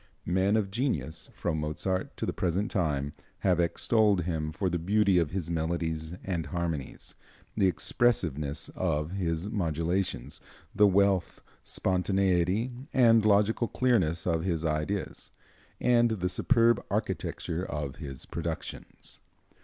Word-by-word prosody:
Men 95 +4 +2
of 100 -3 -1
genius, 85 - -2
from 80 -3 -1
Mozart 90 +5 -2
to - - -2
the - - -2
present 95 +6 -1
time, 75 -6 0 0.3
have 90 -3 +2
extolled 100 +3 +3
him 80 -3 -2
for 95 +4 -2
the 85 -1 0
beauty 100 +1 +3
of 85 -4 +1
his 85 -1 -3
melodies 80 0 -2
and 85 -5 -2
harmonies, 80 -4 -4 0.4
the 100 -3 +3
expressiveness 80 - 0
of 80 -3 -1
his 90 0 -2
modulations, 85 - -1 0.3
the 105 - +5
wealth, 100 -2 +2 0.2
spontaneity 95 +3 +1 0.2
and 115 -4 +5
logical 105 +3 +3
clearness 95 -13 +1
of 80 -2 +1
his 85 -3 -1
ideas, 80 +6 -2 0.5
and 120 -1 +4
the 95 -5 -1
superb 115 +2 +3
architecture 85 +2 -2
of 75 -6 -4
his 70 -5 -7
productions. - - -6
90 Hz, 125 wpm, -29 LUFS, 80-100 Hz, 0.5 s, the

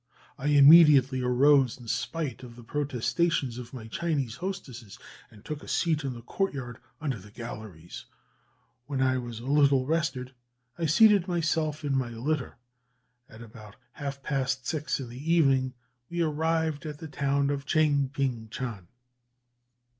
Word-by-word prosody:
I 140 - -4
immediately 145 -3 +7
arose, 130 +1 +4
in 120 - -12
spite 125 +3 -3
of 120 -2 -11
the 120 - -13
protestations 130 +1 -1
of 120 -1 -9
my 125 -4 -8
Chinese 135 -2 -2
hostesses, 135 - -7 0.3
and 105 -2 -18
took 150 -1 -5
a - - -12
seat 160 -3 0
in 135 -2 -3
the 120 - -10
courtyard 130 - -3 0.2
under 135 -7 -3
the 100 +2 -14
galleries. 105 -6 -9 0.8
When 140 -2 -3
I 130 -1 +2
was 120 -2 -7
a - - -9
little 140 -2 +3
rested, 145 -5 -2 0.4
I 165 -1 -1
seated 200 +3 +5
myself 160 -3 -1
in 140 -1 0
my 130 -3 0
litter, 130 +5 -3 0.7
and 110 +2 -12
about 110 -2 -13 0.2
half 140 -2 -6
past 130 -2 -1
six 150 -1 -2
in 130 - -6
the 135 +7 -4
evening 135 -6 +3 0.3
we 170 0 -1
arrived 160 -1 -1
at 150 -1 -6
the 160 - -8
town 140 -1 0
of 140 -1 -4
Tchaing 145 -3 +2
ping 130 -6 -2
tchan." 110 -7 -6
135 Hz, 155 wpm, -28 LUFS, 120-155 Hz, 0.8 s, immediately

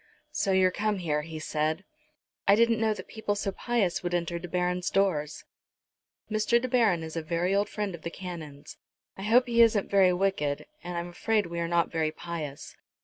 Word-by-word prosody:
"So 300 -10 0
you're 190 -1 +4
come 210 +2 0
here," 155 -5 -1
he 160 +1 -7
said. 155 +2 -1 0.6
"I 200 - +7
didn't 230 0 +3
know 220 -1 +2
that - - -9
people 220 -2 -2
so 200 -1 -2
pious 210 -4 0
would 175 0 -1
enter 170 0 -1
De 180 - -7
Baron's 180 +1 0
doors." 165 -7 0 0.8
"Mr. 215 +2 +2
De 255 - -3
Baron 225 -9 +3
is 160 0 -7
a 165 - -1
very 170 +4 0
old 200 +1 +1
friend 205 -3 -3
of 170 - -8
the 170 - -4
Canon's. 165 -6 -8 0.4
I - - -9
hope 235 +5 +4
he 235 -1 +3
isn't 220 -3 +4
very 195 -2 +5
wicked, 180 -6 0 0.2
and 175 -1 -4
I'm 170 +1 -3
afraid 210 +4 0
we 170 0 -5
are 170 - -1
not 170 0 +1
very 160 -2 +1
pious." 155 -4 -6
180 Hz, 200 wpm, -28 LUFS, 170-210 Hz, 0.8 s, I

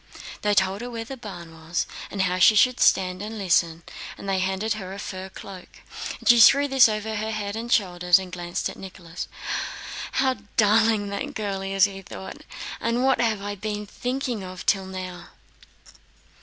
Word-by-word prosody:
They 210 0 +2
told 195 +2 +2
her 245 - -5
where 230 -1 -5
the 270 - -7
barn 180 -9 -9
was 160 +1 -2 0.2
and 195 -2 -1
how 180 0 0
she 215 +4 +7
should 250 +4 +4
stand 185 0 +3
and 220 +2 -5
listen, 170 -4 +1 0.3
and - - -9
they 195 -1 +1
handed 190 +3 0
her 190 -3 -6
a - - -7
fur 190 -1 -6
cloak. 190 -1 -10 0.6
She 240 -1 +7
threw 280 +5 +7
this 270 -4 +6
over 215 0 -2
her 215 +1 -2
head 210 -2 -3
and 235 +2 -5
shoulders 180 -4 +4
and 190 -1 -6
glanced 175 -1 -3
at - - -8
Nicholas. 180 -3 -8 0.9
"What 265 -1 +2
a - - -19 0.2
darling 215 -1 +4
that 275 +9 -4
girl 200 -3 -2
is!" 195 0 +3 0.2
thought 190 - -8
he. - - -17 0.3
"And 235 +2 0
what 265 -1 +3
have 220 -4 0
I 205 0 -3
been 210 +1 -4
thinking 245 0 -3
of 185 -1 -8
till 195 -2 +2
now?" 185 -2 -7
200 Hz, 185 wpm, -25 LUFS, 185-225 Hz, 0.9 s, she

